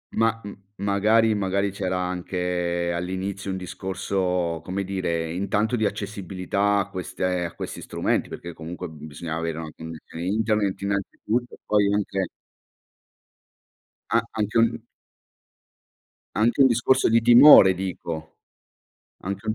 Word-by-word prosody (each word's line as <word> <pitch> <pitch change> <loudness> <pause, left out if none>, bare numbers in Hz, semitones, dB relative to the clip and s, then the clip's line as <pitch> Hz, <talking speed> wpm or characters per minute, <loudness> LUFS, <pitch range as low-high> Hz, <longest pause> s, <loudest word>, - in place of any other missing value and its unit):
ma 115 0 +1
m 100 - -7 0.3
magari 110 +3 +3
magari 100 0 0
c'era 95 -2 -2
anche 90 -1 -2
all'inizio 95 +3 -4
un 95 - -2
discorso, 90 -2 -2
come 95 +3 -3
dire, 85 -4 -2
intanto 100 +5 0
di 110 -2 +1
accessibilità 100 0 -1
a 100 - -1
queste 90 -1 -2
a 85 - -6
questi - - -6
strumenti, - - -1
perché 85 -1 -7
comunque 85 +2 -7
bisognava 80 +1 -6
avere 80 -1 -3
una 80 -2 -6
connessione 80 +1 -8
internet 105 -1 0
innanzitutto, 100 +4 -2
poi 100 -1 +3
anche 95 -3 -1 1.8
A 115 - +4
anche 110 +1 -1
un 115 0 +2 1.5
anche 120 +5 +3
un - - +7
discorso 130 +2 +3
di 115 0 +5
timore 120 -5 +9
dico, 85 -3 -5 0.9
anche 100 +3 -5
un 110 - +1
95 Hz, 125 wpm, -24 LUFS, 90-105 Hz, 1.8 s, timore